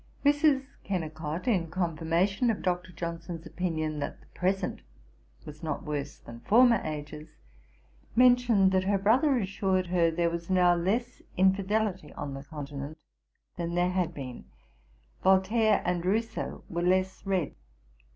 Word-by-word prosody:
Mrs. 290 -2 +4 0.2
Kennicot, 160 0 -4
in 180 -9 +1
confirmation 175 +6 0
of 220 - -1
Dr. 180 0 -1
Johnson's 170 -1 -6
opinion, 155 -4 -2
that 145 - -4
the - - -22
present 190 +1 -1 0.6
was 150 0 -10
not 155 -3 -3
worse 145 -2 -4
than 115 0 -11
former 235 - +5
ages, 155 0 -7 0.8
mentioned 245 -6 +5
that 185 0 +2
her 200 +1 +2
brother 250 +8 +3
assured 190 -3 0
her, 175 -1 +2
there 170 +1 0
was 170 +1 -5
now 180 -1 +5
less 210 +8 -1 0.2
infidelity 190 -2 +1
on 145 -1 -5
the 135 0 -7
Continent 145 0 -7 0.6
than 170 0 -3
there 175 +1 +2
had 180 -2 0
been; 130 -6 -8 0.8
Voltaire 200 +3 +3
and 175 -1 0
Rousseau 220 +4 -2
were 170 0 -3
less 185 +1 +1
read. 190 -5 -1
180 Hz, 135 wpm, -29 LUFS, 160-200 Hz, 0.8 s, former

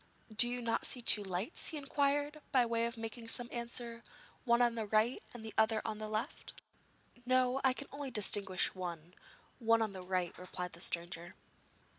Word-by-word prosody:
'Do 240 - +8
you 245 0 -3
not 230 -1 -1
see 255 - +3
two 220 -3 +7
lights?' 190 - -1
he 315 - 0
inquired 290 +1 -1
by 255 -3 +4
way 230 0 0
of 235 0 -7
making 225 +1 -7
some 240 +1 -1
answer; 235 0 -5 0.4
'one 235 -1 +3
on 240 -1 +3
the 225 -2 -4
right 215 +4 +1
and 235 -2 -10
the 220 - -8
other 220 0 +3
on 215 -1 -4
the 215 0 -5
left.' 215 +1 -5 0.6
'No; 255 +1 +2
I 265 -1 +4
can 280 - -8
only 285 -1 -5
distinguish 200 -4 +2
one 175 -2 -7 0.5
one 230 -1 +3
on 215 - -3
the 190 -1 -8
right,' 180 -1 -2
replied 180 0 -6
the 170 - -13
stranger. 170 0 -3
230 Hz, 185 wpm, -34 LUFS, 195-245 Hz, 0.6 s, Do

